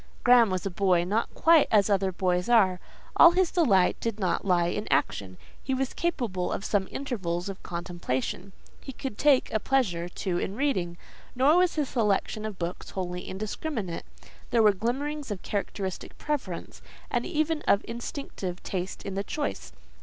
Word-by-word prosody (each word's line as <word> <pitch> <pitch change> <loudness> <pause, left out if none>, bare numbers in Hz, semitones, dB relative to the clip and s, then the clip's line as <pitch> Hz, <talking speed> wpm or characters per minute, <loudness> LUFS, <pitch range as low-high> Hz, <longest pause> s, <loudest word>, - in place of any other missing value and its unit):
Graham 245 -2 +6
was 185 0 -2
a 195 - -1
boy 180 -1 +2
not 210 +6 -1
quite 325 -2 +5
as 205 -3 +4
other 195 -2 +2
boys 180 +1 0
are; 190 -6 +4 0.4
all 345 - +9
his 365 -1 +2
delight 205 - +3
did 230 -2 -3
not 185 -4 0
lie 180 -3 +3
in 205 +5 -2
action: 95 -2 0 0.3
he 265 - -1
was 265 0 -2
capable 230 - -1
of 195 - -3
some 195 -2 +1
intervals 190 -10 -3
of 195 - -7
contemplation; 175 0 -4 0.3
he 270 - -8
could 260 -2 -5
take 275 0 +3
a 220 - +2
pleasure 195 -9 0
too 180 -1 -2
in 195 - -3
reading, 190 -11 -1 0.4
nor 270 +5 +5
was 360 -1 +3
his 295 -4 0
selection 215 -1 0
of 210 -3 -7
books 175 0 -5
wholly 180 -1 -4
indiscriminate: 210 - -4 0.4
there 230 -2 +3
were 210 -1 +6
glimmerings 270 +8 -2
of 205 -3 -5
characteristic 195 -2 -4
preference, 260 - -4 0.3
and - - +1
even 310 -2 0
of 200 - +3
instinctive 230 -6 -5
taste 185 0 -4
in 195 - -4
the 195 +1 -2
choice. 95 - -4
200 Hz, 170 wpm, -27 LUFS, 180-260 Hz, 0.4 s, all